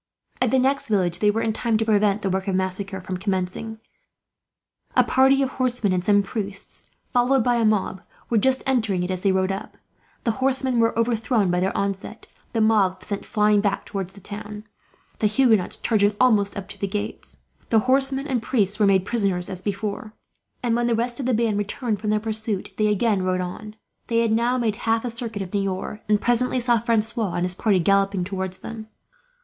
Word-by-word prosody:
At 255 - +3
the 265 - +3
next 270 0 +1
village 180 -5 +1
they 210 - +3
were 220 +2 0
in 220 - 0
time 230 0 0
to 225 - -1
prevent 210 -1 +2
the 195 - 0
work 190 +1 -2
of 190 - 0
massacre 190 +1 -2
from 185 0 -4
commencing. 190 +3 -3 1.2
A - - +6
party 270 +1 +4
of 265 - -1
horsemen 245 -6 0
and 180 -1 0
some 205 +1 +4
priests, 200 -2 -6 0.2
followed 250 0 +3
by 245 0 +2
a 230 - +2
mob, 205 -3 0 0.3
were 230 - +2
just 265 +4 +2
entering 220 -9 +1
it 180 - -2
as 185 -1 -3
they 195 - +3
rode 190 0 +1
up. 195 - -6 0.5
The 230 - +1
horsemen 260 -2 +1
were 230 0 +2
overthrown 230 -3 +1
by 180 - +1
their 190 +2 -1
onset, 200 +2 -3 0.3
the 225 - 0
mob 200 -4 +2
sent 200 - -5
flying 210 -1 +3
back 200 -1 -1
towards 190 -2 -5
the 200 - -14
town, 210 +1 -8 0.6
the 215 - +3
Huguenots 220 -4 +2
charging 205 -2 +2
almost 215 -5 +3
up 195 -1 -6
to - - -10
the 200 - -1
gates. 205 +1 -5 0.3
The 220 -1 +4
horsemen 270 +2 +2
and 260 -6 -1
priests 210 -4 0
were 210 - +4
made 190 -1 +3
prisoners, 195 -6 -1
as 185 -1 -2
before; 210 +3 -4 0.5
and 235 -2 +1
when 240 0 +1
the 235 - +2
rest 240 +2 -2
of 260 - -2
the 255 - +2
band 220 -2 +1
returned 205 +1 -2
from 215 - -2
their 215 0 +2
pursuit, 220 -2 -3
they 215 - +2
again 210 -1 +1
rode 185 0 0
on. 210 +4 -6 0.3
They 230 -1 +2
had 230 -1 +1
now 235 +3 +2
made 220 -4 0
half 225 +1 +2
a 245 - -2
circuit 225 -3 -4
of 180 - -9
Niort, 195 +1 -2
and 210 -1 +4
presently 245 +2 +2
saw 240 -1 +2
Francois 225 -3 0
and 175 - 0
his 180 - -1
party, 200 +1 +2
galloping 195 +1 +2
towards 190 0 -4
them. 220 -1 -7
215 Hz, 205 wpm, -23 LUFS, 195-235 Hz, 1.2 s, A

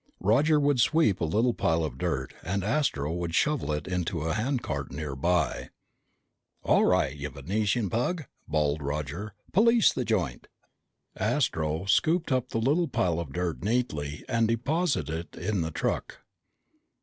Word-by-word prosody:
Roger 145 +10 +4
would 145 -2 +2
sweep 155 - +3
up - - -18
a - - +2
little 120 +6 +2
pile 80 -5 +1
of 65 -5 -4
dirt 65 0 -2
and 95 +2 -2
Astro 100 - 0
would 85 -1 -3
shovel 150 - +1
it 75 +1 -2
into 90 -2 -2
a 80 +1 -1
handcart 105 - -2
nearby. 75 +3 -1 0.9
"All - - +4
right, - - +2
you 75 0 -5
Venusian 100 - -1
pug!" 130 - -1 0.2
bawled 75 -1 0
Roger. 75 +8 -4 0.2
"Police 230 +3 +5
the - - -1
joint!" - - -1 0.7
Astro 80 +2 0
scooped 160 - +2
up 130 -1 +1
the - - -2
little 145 +9 +2
pile 85 - 0
of 80 -5 -5
dirt 90 +1 -3
neatly 75 -11 -1
and 115 -2 +2
deposited 115 - -1
it - - -10
in 100 +1 -1
the 80 - -1
truck. 80 - -2
95 Hz, 150 wpm, -28 LUFS, 80-125 Hz, 0.9 s, Police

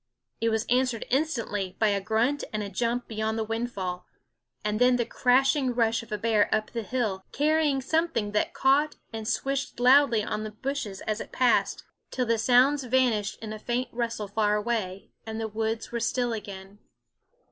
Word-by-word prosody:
It 230 - +1
was 220 0 0
answered 250 -2 +1
instantly 230 - -1
by 220 - +3
a 200 -1 0
grunt 230 +8 0
and 215 -1 -2
a 200 - -6
jump 235 +4 -1
beyond 220 0 -2
the 225 - 0
windfall 210 -6 -4 0.6
and 210 0 0
then 250 0 +5
the 240 -1 0
crashing 265 +1 +2
rush 230 -1 +2
of 230 -1 -15
a 210 - -1
bear 215 -1 +2
up 215 0 0
the 230 - -3
hill, 215 -5 -2
carrying 300 -1 +2
something 315 -8 0
that 210 - 0
caught 285 +3 +3 0.2
and 220 -1 -5
swished 275 +2 -2
loudly 250 -3 +5
on 215 - -3
the 215 - -4
bushes 215 -3 -4
as 215 0 -2
it - - -9
passed, 250 -2 +2 0.3
till 255 - -1
the 230 -1 +1
sounds 260 +5 +4
vanished 240 -5 +1
in 215 -1 -5
a 215 - -7
faint 240 +2 -2
rustle 230 -3 -3
far 210 +1 +1
away, 210 -4 -3 0.2
and 220 0 -4
the 225 - -2
woods 220 +1 -3
were 235 - -2
still 240 +1 0
again. 200 -2 -8
230 Hz, 180 wpm, -27 LUFS, 215-255 Hz, 0.6 s, then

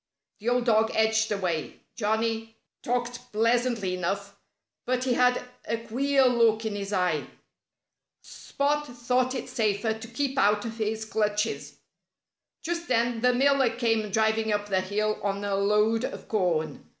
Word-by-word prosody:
The 220 +3 -1
old 245 0 +1
dog 220 -1 +3
edged 220 0 +2
away. 180 -6 -2
Johnnie 225 +1 -1 0.3
talked 245 0 -3
pleasantly 230 -3 +1
enough. 195 +3 -3 0.5
But 255 0 0
he 255 -1 +1
had 250 0 +3 0.2
a 230 - -1
queer 265 +4 +1
look 230 -3 +3
in 220 - -2
his 200 0 -4
eye. 180 -6 0 1.0
Spot 295 +1 -2
thought 250 +2 +1
it 255 - -4
safer 220 0 0
to 220 +1 -9
keep 270 +3 -2
out 210 -2 +3
of 230 0 -6
his 220 0 -2
clutches. 210 0 -1 0.9
Just 340 +1 -3
then 235 -1 +1
the 250 +1 +4
miller 270 0 +3
came 225 -2 0
driving 220 +1 +1
up 205 0 -1
the 190 -1 +2
hill 210 +3 -1
on 200 0 -2
a 200 - -1
load 210 +3 +2
of - - -5
corn. 165 -8 -1
225 Hz, 150 wpm, -27 LUFS, 205-245 Hz, 1.0 s, the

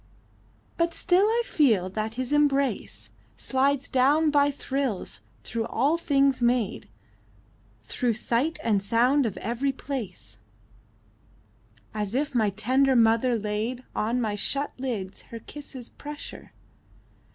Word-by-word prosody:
But 335 0 +1
still 370 +2 +3
I 460 +2 +2
feel 235 - +3
that 220 +2 -3
His 255 +2 -2
embrace 280 -2 +1 0.3
Slides 275 +1 +1
down 290 +4 +3
by 285 -1 +4
thrills, 270 -6 -3 0.2
through 230 -1 -3
all 280 +7 +2
things 275 -5 +2
made, 240 - 0 0.9
Through 245 -2 -1
sight 240 +7 0
and 210 -4 +2
sound 245 +6 +3
of 205 - -5
every 245 +4 -1
place: 230 - -6 1.6
As 210 +1 -3
if 285 +2 0
my 220 -4 +3
tender 260 +7 +2
mother 230 +1 +4
laid 215 +4 -3
On 230 +4 0
my 220 -3 -1
shut 275 +7 -1
lids, 215 -8 -4
her 230 - -7
kisses' 260 0 -9
pressure. 295 0 -9
255 Hz, 120 wpm, -26 LUFS, 225-280 Hz, 1.6 s, by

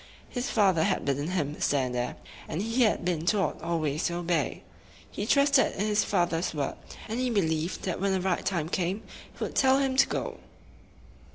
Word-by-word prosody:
His 250 +2 -3
father 190 -7 +3
had 195 -2 0
bidden 140 +1 0
him 155 -5 -2
stand 130 -3 +1
there, 125 0 -2 0.3
and 155 - -3
he 230 +3 0
had 215 -6 +2
been 170 -3 0
taught 185 -3 +1
always 155 -2 -1
to 170 - 0
obey. 170 -4 -1 0.5
He 205 - -4
trusted 280 +2 +4
in 200 - -1
his 210 0 +2
father's 175 -3 0
word, 140 -2 -1 0.3
and 225 +3 -3
be 255 0 +1
lieved 160 +1 -2
that 185 -1 -2
when 200 0 +1
the 190 - +1
right 185 -1 0
time 170 -5 -1
came 185 +4 -1 0.3
he - - -6
would - - -4
tell 265 0 +4
him 270 -1 +1
to - - +6
go. - - -3
180 Hz, 190 wpm, -28 LUFS, 160-210 Hz, 0.5 s, to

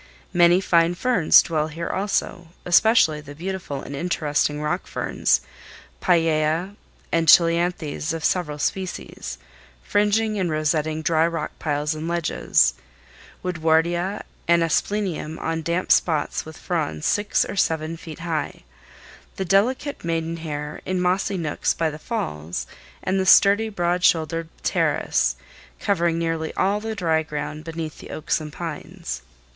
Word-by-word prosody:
Many 175 +1 +5
fine 170 -2 +3
ferns 210 -5 +5
dwell 155 -2 -1
here 165 +2 -5
also, 190 -3 -2 0.2
especially 175 -4 +4
the 145 -1 -11
beautiful 175 -4 -4
and 140 - -7
interesting 150 -2 0
rock 150 +5 -2
ferns—pellaea, 165 +2 0 0.4
and 165 -1 +1
cheilanthes 170 -2 +3
of 165 -1 -3
several 160 -5 0
species—fringing 205 +4 -2
and 180 -2 0
rosetting 155 0 0
dry 160 0 +3
rock 165 -2 -3
piles 150 0 -1
and 155 +1 -5
ledges; 160 - +2 0.7
woodwardia 175 +3 +1 0.2
and 170 0 +4
asplenium 165 -2 -1
on 165 0 -2
damp 170 +3 -1
spots 155 -4 +2
with 160 0 -10
fronds 155 -3 -2
six 205 0 +2
or - - -6
seven 160 -3 0
feet 165 -1 -10
high; 165 -3 -3 0.7
the 190 - -3
delicate 245 - +1
maiden 165 0 -2
hair 150 -2 -5
in 185 0 -2
mossy 185 +2 +1
nooks 155 -4 -1
by 160 -1 0
the 150 - -9
falls, 85 - -4 0.4
and 190 +1 0
the 190 - 0
sturdy, 205 +4 +6
broad 175 -2 -1
shouldered 165 0 +2
pteris - - +1 0.4
covering 170 -4 +1
nearly 165 -1 -1
all 200 +2 +1
the 220 +1 -4
dry 165 -5 +1
ground 150 0 -5
beneath 160 -1 -6
the - - -11
oaks 155 - -1
and 150 -1 -7
pines. 160 - -6
165 Hz, 130 wpm, -23 LUFS, 155-180 Hz, 0.7 s, sturdy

